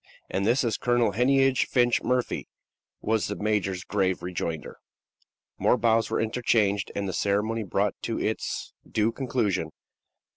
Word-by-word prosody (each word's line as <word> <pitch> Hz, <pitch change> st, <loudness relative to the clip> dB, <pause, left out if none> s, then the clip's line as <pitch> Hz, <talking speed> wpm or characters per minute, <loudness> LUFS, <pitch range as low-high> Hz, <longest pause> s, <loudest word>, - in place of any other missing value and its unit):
"And 100 Hz, +1 st, 0 dB
this 125 Hz, +5 st, +3 dB
is 115 Hz, -3 st, -1 dB
Colonel 120 Hz, -3 st, +2 dB
Heneage 135 Hz, +4 st, +3 dB
Finch 120 Hz, -2 st, +2 dB
Murphy," 125 Hz, 0 st, -1 dB, 0.5 s
was 110 Hz, 0 st, 0 dB
the 105 Hz, -, -3 dB
major's 100 Hz, -4 st, -1 dB
grave 95 Hz, -3 st, 0 dB
rejoinder. 85 Hz, -3 st, -4 dB, 0.8 s
More -, -, +3 dB
bows 115 Hz, -1 st, +2 dB
were -, -, 0 dB
interchanged 110 Hz, -3 st, +1 dB
and 100 Hz, -1 st, -2 dB
the 95 Hz, -, -3 dB
ceremony 105 Hz, +4 st, 0 dB
brought 100 Hz, -, 0 dB
to -, -, -2 dB
its -, -, -3 dB, 0.2 s
due 110 Hz, +1 st, +1 dB
conclusion. 110 Hz, -, -1 dB
110 Hz, 140 wpm, -26 LUFS, 100-120 Hz, 0.8 s, this